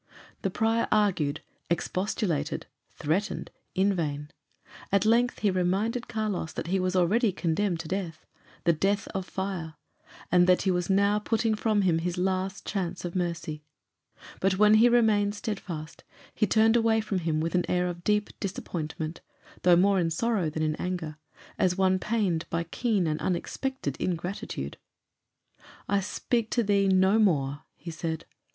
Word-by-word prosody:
The 195 Hz, -, 0 dB
prior 225 Hz, +4 st, +1 dB
argued, 175 Hz, -9 st, +2 dB, 0.3 s
expostulated, 180 Hz, 0 st, -1 dB, 0.2 s
threatened 180 Hz, +8 st, -2 dB, 0.2 s
in 195 Hz, +1 st, +3 dB
vain. 150 Hz, -4 st, -3 dB, 0.6 s
At 200 Hz, +1 st, +3 dB
length 240 Hz, +3 st, +3 dB
he 205 Hz, -, +3 dB
reminded 195 Hz, +7 st, 0 dB
Carlos 215 Hz, -7 st, -2 dB
that -, -, -4 dB
he 190 Hz, +3 st, 0 dB
was 185 Hz, 0 st, 0 dB
already 205 Hz, +5 st, +3 dB
condemned 175 Hz, 0 st, 0 dB
to 160 Hz, -, -9 dB
death 170 Hz, -3 st, -4 dB, 0.4 s
the 170 Hz, -, +4 dB
death 200 Hz, +5 st, 0 dB
of 190 Hz, -1 st, -4 dB
fire; 185 Hz, -5 st, -4 dB, 0.6 s
and 180 Hz, 0 st, +5 dB
that 180 Hz, 0 st, +4 dB
he 190 Hz, -, +2 dB
was 180 Hz, 0 st, -1 dB
now 200 Hz, +2 st, +3 dB
putting 225 Hz, +1 st, +1 dB
from 215 Hz, -1 st, +1 dB
him 170 Hz, -3 st, +3 dB
his 175 Hz, +2 st, -2 dB
last 190 Hz, +1 st, -1 dB
chance 180 Hz, -3 st, -3 dB
of 175 Hz, -, -5 dB
mercy. 170 Hz, -4 st, -3 dB, 0.8 s
But 190 Hz, 0 st, +2 dB
when 210 Hz, +1 st, +6 dB
he 220 Hz, +2 st, +7 dB
still 240 Hz, -, +5 dB
remained 210 Hz, -3 st, +3 dB
steadfast, 180 Hz, -8 st, -6 dB, 0.3 s
he 215 Hz, -, +1 dB
turned 225 Hz, +2 st, +4 dB
away 225 Hz, -1 st, +3 dB
from 210 Hz, -3 st, -1 dB
him 160 Hz, -2 st, 0 dB
with 165 Hz, +1 st, -1 dB
an 180 Hz, -1 st, +1 dB
air 180 Hz, 0 st, +2 dB
of 175 Hz, -1 st, -4 dB
deep 210 Hz, +1 st, +1 dB
disappointment, 165 Hz, -4 st, -4 dB, 0.4 s
though 180 Hz, -1 st, +6 dB
more 195 Hz, +2 st, +4 dB
in 170 Hz, -2 st, +1 dB
sorrow 195 Hz, 0 st, 0 dB
than 155 Hz, +1 st, -3 dB
in 155 Hz, -1 st, 0 dB
anger, 175 Hz, -4 st, -4 dB, 0.4 s
as 180 Hz, 0 st, +2 dB
one 190 Hz, -1 st, +3 dB
pained 195 Hz, -7 st, 0 dB
by 170 Hz, 0 st, -1 dB
keen 205 Hz, +2 st, 0 dB
and 155 Hz, -1 st, -1 dB
unexpected 185 Hz, -, -2 dB
ingratitude. 175 Hz, -, -3 dB, 1.1 s
"I 200 Hz, 0 st, +2 dB
speak 220 Hz, +3 st, -1 dB
to 235 Hz, -, +1 dB
thee 200 Hz, -1 st, +2 dB
no 190 Hz, +3 st, +4 dB
more," 145 Hz, -9 st, +1 dB
he 170 Hz, -, -8 dB
said. 160 Hz, -1 st, -4 dB
185 Hz, 160 wpm, -28 LUFS, 170-210 Hz, 1.1 s, he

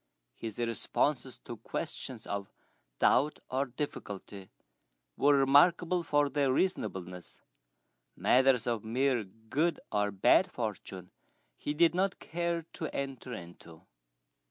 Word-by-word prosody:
His 110 Hz, -3 st, -6 dB
responses 115 Hz, -3 st, -1 dB
to -, -, -7 dB
questions -, -, -5 dB
of 100 Hz, -1 st, -4 dB, 0.5 s
doubt 150 Hz, +4 st, +3 dB
or 135 Hz, +2 st, 0 dB
difficulty 100 Hz, -7 st, -6 dB, 0.7 s
were 145 Hz, 0 st, +4 dB
remarkable 170 Hz, +6 st, +4 dB
for 145 Hz, -3 st, +2 dB
their 140 Hz, -1 st, +1 dB
reasonableness; 95 Hz, -, -2 dB, 0.8 s
matters 130 Hz, -2 st, +4 dB
of 115 Hz, -3 st, -1 dB
mere 125 Hz, +1 st, +1 dB
good 115 Hz, -, -2 dB
or 105 Hz, -1 st, +1 dB
bad 100 Hz, -, +4 dB
fortune 95 Hz, -5 st, -5 dB, 0.4 s
he 145 Hz, -, -4 dB
did 165 Hz, +1 st, +5 dB
not 190 Hz, +1 st, 0 dB
care 170 Hz, 0 st, -2 dB
to 160 Hz, -, -4 dB
enter 135 Hz, -2 st, -4 dB
into. 85 Hz, -4 st, -11 dB
130 Hz, 110 wpm, -31 LUFS, 105-150 Hz, 0.8 s, did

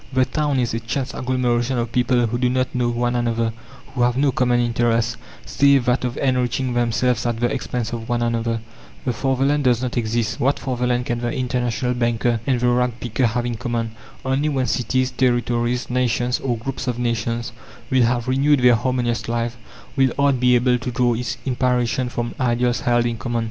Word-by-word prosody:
The 130 Hz, -1 st, +3 dB
town 145 Hz, -1 st, -1 dB
is 120 Hz, -3 st, 0 dB
a 115 Hz, -, -1 dB
chance 125 Hz, +3 st, -3 dB
agglomeration 125 Hz, -1 st, 0 dB
of 120 Hz, -1 st, -2 dB
people 125 Hz, 0 st, +2 dB
who 120 Hz, +2 st, -2 dB
do 125 Hz, 0 st, +2 dB
not 130 Hz, 0 st, 0 dB
know 125 Hz, -1 st, +1 dB
one 120 Hz, +1 st, 0 dB
another, 115 Hz, -1 st, 0 dB, 0.4 s
who 125 Hz, -, -2 dB
have 120 Hz, +1 st, +2 dB
no 140 Hz, 0 st, +3 dB
common 125 Hz, -1 st, +2 dB
interest, 115 Hz, -1 st, +1 dB, 0.3 s
save 140 Hz, -3 st, +3 dB
that 125 Hz, +1 st, +1 dB
of 125 Hz, -1 st, -2 dB
enriching 125 Hz, -1 st, 0 dB
themselves 120 Hz, 0 st, +1 dB
at 120 Hz, -1 st, -2 dB
the 120 Hz, 0 st, +1 dB
expense 120 Hz, -2 st, -3 dB
of 115 Hz, +1 st, -5 dB
one 120 Hz, 0 st, +1 dB
another. 115 Hz, -1 st, -1 dB, 0.4 s
The 125 Hz, -, 0 dB
fatherland 135 Hz, +4 st, +1 dB
does 125 Hz, -1 st, +3 dB
not 125 Hz, 0 st, -3 dB
exist.... 115 Hz, -1 st, -1 dB
What 140 Hz, +3 st, +2 dB
fatherland 125 Hz, -2 st, -1 dB
can 120 Hz, 0 st, -2 dB
the 120 Hz, 0 st, -2 dB
international 125 Hz, 0 st, -1 dB
banker 120 Hz, -1 st, 0 dB
and 130 Hz, -3 st, +2 dB
the 125 Hz, 0 st, +2 dB
rag 120 Hz, -1 st, +1 dB
picker 120 Hz, +1 st, 0 dB
have 120 Hz, +2 st, -1 dB
in 120 Hz, -2 st, -2 dB
common? 115 Hz, -2 st, -2 dB, 0.3 s
Only 135 Hz, +3 st, +1 dB
when 135 Hz, -3 st, 0 dB
cities, 130 Hz, +1 st, 0 dB
territories, 120 Hz, -1 st, 0 dB
nations, 125 Hz, 0 st, 0 dB
or 125 Hz, -3 st, -1 dB
groups 130 Hz, +3 st, -5 dB
of 125 Hz, -1 st, -1 dB
nations, 120 Hz, 0 st, -2 dB, 0.4 s
will 130 Hz, -1 st, +4 dB
have 120 Hz, 0 st, 0 dB
renewed 140 Hz, +2 st, +3 dB
their 125 Hz, -1 st, +6 dB
harmonious 120 Hz, -1 st, -1 dB
life, 115 Hz, 0 st, -1 dB, 0.4 s
will 135 Hz, -2 st, +3 dB
art 140 Hz, -2 st, +2 dB
be 125 Hz, 0 st, +4 dB
able 125 Hz, 0 st, +2 dB
to 125 Hz, -, -4 dB
draw 125 Hz, -1 st, +1 dB
its 120 Hz, +2 st, -3 dB
inspiration 125 Hz, -1 st, 0 dB
from 120 Hz, -1 st, -3 dB
ideals 120 Hz, -1 st, +1 dB
held 120 Hz, -1 st, +2 dB
in 120 Hz, -1 st, -1 dB
common. 120 Hz, +3 st, -2 dB
120 Hz, 195 wpm, -21 LUFS, 120-125 Hz, 0.4 s, their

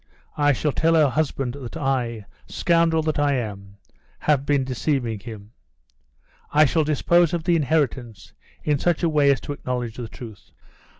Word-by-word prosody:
I 145 Hz, -1 st, +3 dB
shall 145 Hz, +3 st, 0 dB
tell 165 Hz, +3 st, +2 dB
her 155 Hz, -3 st, +4 dB
husband 135 Hz, -2 st, -1 dB
that 135 Hz, 0 st, -8 dB
I, 125 Hz, -7 st, -2 dB, 0.2 s
scoundrel 165 Hz, -2 st, +2 dB
that 155 Hz, -1 st, -1 dB
I 145 Hz, -1 st, +2 dB
am, 100 Hz, -4 st, -6 dB, 0.4 s
have 140 Hz, -2 st, 0 dB
been 145 Hz, -2 st, +2 dB
deceiving 130 Hz, -3 st, -2 dB
him. 105 Hz, -1 st, -10 dB, 1.0 s
I 155 Hz, +1 st, +5 dB
shall 160 Hz, +3 st, +1 dB
dispose 170 Hz, +3 st, +2 dB
of 165 Hz, -, -4 dB
the 175 Hz, 0 st, +2 dB
inheritance 130 Hz, -, -1 dB, 0.3 s
in 150 Hz, -2 st, +1 dB
such 175 Hz, +1 st, 0 dB
a 170 Hz, -, +3 dB
way 150 Hz, -2 st, +3 dB
as 135 Hz, -, +1 dB
to 145 Hz, -, -5 dB
acknowledge 125 Hz, -4 st, -4 dB
the 120 Hz, -2 st, -5 dB
truth. 110 Hz, -2 st, -12 dB
140 Hz, 165 wpm, -23 LUFS, 120-155 Hz, 1.0 s, I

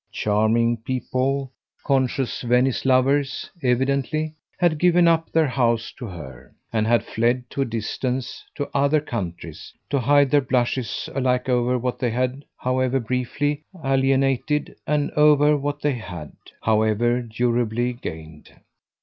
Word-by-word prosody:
Charming 110 Hz, +3 st, +1 dB
people, 130 Hz, +3 st, -2 dB, 0.3 s
conscious 135 Hz, -1 st, 0 dB
Venice 125 Hz, +2 st, +1 dB
lovers, 135 Hz, +1 st, +2 dB
evidently, 140 Hz, +4 st, 0 dB, 0.2 s
had 165 Hz, -4 st, +2 dB
given 175 Hz, 0 st, +4 dB
up 165 Hz, -1 st, +2 dB
their 160 Hz, -1 st, +3 dB
house 120 Hz, -4 st, 0 dB
to 120 Hz, -, -5 dB
her, 75 Hz, -, -10 dB, 0.2 s
and 110 Hz, -1 st, +1 dB
had 115 Hz, -2 st, +3 dB
fled 120 Hz, +3 st, 0 dB
to 140 Hz, -, -2 dB
a -, -, +2 dB
distance, 125 Hz, +3 st, -3 dB
to 145 Hz, -, -3 dB
other 140 Hz, +2 st, +3 dB
countries, 100 Hz, -, -6 dB, 0.2 s
to 140 Hz, -, +2 dB
hide 140 Hz, +2 st, +4 dB
their 145 Hz, -, +5 dB
blushes 125 Hz, -2 st, -1 dB
alike 125 Hz, -2 st, 0 dB
over 125 Hz, 0 st, +2 dB
what 125 Hz, 0 st, -3 dB
they 125 Hz, -, 0 dB
had, 130 Hz, +4 st, -2 dB
however 130 Hz, +1 st, 0 dB
briefly, 130 Hz, +5 st, -2 dB, 0.2 s
alienated, 135 Hz, +2 st, +1 dB
and 150 Hz, -1 st, 0 dB
over 150 Hz, 0 st, +5 dB
what 145 Hz, +1 st, -3 dB
they 145 Hz, -1 st, +2 dB
had, 90 Hz, -, -7 dB, 0.3 s
however 110 Hz, +3 st, +2 dB
durably, 120 Hz, +1 st, 0 dB
gained. 80 Hz, -9 st, -9 dB
130 Hz, 130 wpm, -23 LUFS, 120-140 Hz, 0.3 s, their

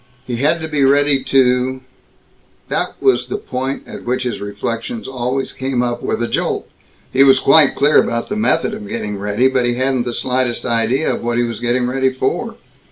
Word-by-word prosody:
He 120 Hz, -2 st, -3 dB
had 150 Hz, +6 st, +2 dB
to 160 Hz, -, -3 dB
be 150 Hz, -3 st, 0 dB
ready 140 Hz, 0 st, +3 dB
to 130 Hz, 0 st, +2 dB, 0.9 s
That -, -, -2 dB
was 395 Hz, -, +2 dB
the 405 Hz, -, -3 dB
point 135 Hz, -, -4 dB
at -, -, -9 dB
which 130 Hz, +1 st, -1 dB
his 125 Hz, -4 st, -3 dB
reflections 115 Hz, -, -4 dB
always 130 Hz, +1 st, -2 dB
came 130 Hz, -2 st, -1 dB
up 120 Hz, -1 st, -2 dB
with 120 Hz, -, -2 dB
a -, -, 0 dB
jolt. -, -, -2 dB, 0.5 s
He 135 Hz, +1 st, +6 dB
was 135 Hz, -1 st, +6 dB
quite 145 Hz, +2 st, +5 dB
clear 145 Hz, +2 st, +4 dB
about 115 Hz, 0 st, -2 dB
the 210 Hz, -, -3 dB
method 215 Hz, 0 st, +1 dB
of 210 Hz, -1 st, -7 dB
getting 155 Hz, -, -4 dB
ready, 105 Hz, +5 st, +1 dB
but 130 Hz, -2 st, +1 dB
he 120 Hz, -, 0 dB
hadn't 130 Hz, -1 st, 0 dB
the 120 Hz, -, -3 dB
slightest 125 Hz, -1 st, -1 dB
idea 120 Hz, +5 st, +1 dB
of -, -, -4 dB
what 120 Hz, 0 st, -1 dB
he 120 Hz, -, +2 dB
was 115 Hz, -2 st, -4 dB
getting 120 Hz, +1 st, 0 dB
ready 130 Hz, +1 st, +1 dB
for. 130 Hz, -, -2 dB
130 Hz, 200 wpm, -18 LUFS, 120-135 Hz, 0.9 s, He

